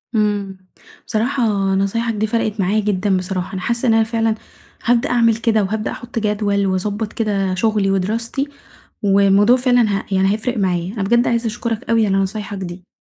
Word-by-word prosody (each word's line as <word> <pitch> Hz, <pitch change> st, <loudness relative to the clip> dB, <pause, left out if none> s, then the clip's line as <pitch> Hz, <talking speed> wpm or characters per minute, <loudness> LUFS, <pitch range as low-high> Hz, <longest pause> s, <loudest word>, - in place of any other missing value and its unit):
امم، 205 Hz, -3 st, 0 dB, 0.5 s
بصراحة 245 Hz, +4 st, 0 dB, 0.3 s
نصايحك 230 Hz, +4 st, 0 dB
دي 215 Hz, 0 st, -1 dB
فرقت 220 Hz, -1 st, -1 dB
معايا 195 Hz, +3 st, +2 dB
جدًا 200 Hz, -2 st, +1 dB
بصراحة، 185 Hz, 0 st, -4 dB
أنا 190 Hz, -, -4 dB
حاسة 235 Hz, +5 st, -1 dB
إن 225 Hz, -, +4 dB
أنا 225 Hz, 0 st, +4 dB
فعلًا 225 Hz, 0 st, 0 dB, 0.5 s
هابدأ 235 Hz, 0 st, +2 dB
أعمل 230 Hz, -2 st, +3 dB
كده، 220 Hz, -1 st, +1 dB
وهابدأ 215 Hz, +2 st, -2 dB
أحُطّ 240 Hz, -1 st, -5 dB
جدول، 205 Hz, -2 st, 0 dB
وأضبّط 205 Hz, +3 st, -2 dB
كده 195 Hz, -4 st, -1 dB
شُغلي 210 Hz, -1 st, +1 dB
ودراستي، 225 Hz, +8 st, -1 dB, 0.6 s
والموضوع 200 Hz, +3 st, +5 dB
فعلًا 245 Hz, -1 st, +3 dB, 0.2 s
ه -, -, -10 dB
يعني 195 Hz, +1 st, +2 dB
هيفرق 235 Hz, +3 st, -2 dB
معايا، 180 Hz, -2 st, -1 dB
أنا 210 Hz, -4 st, -3 dB
بجد 235 Hz, +5 st, +2 dB
عايزة 235 Hz, 0 st, 0 dB
أشكرك 230 Hz, +1 st, -4 dB
أوي 225 Hz, -1 st, +3 dB
على 195 Hz, -, +1 dB
نصايحك 200 Hz, +1 st, -2 dB
دي. 180 Hz, -1 st, -7 dB
210 Hz, 170 wpm, -19 LUFS, 195-230 Hz, 0.6 s, والموضوع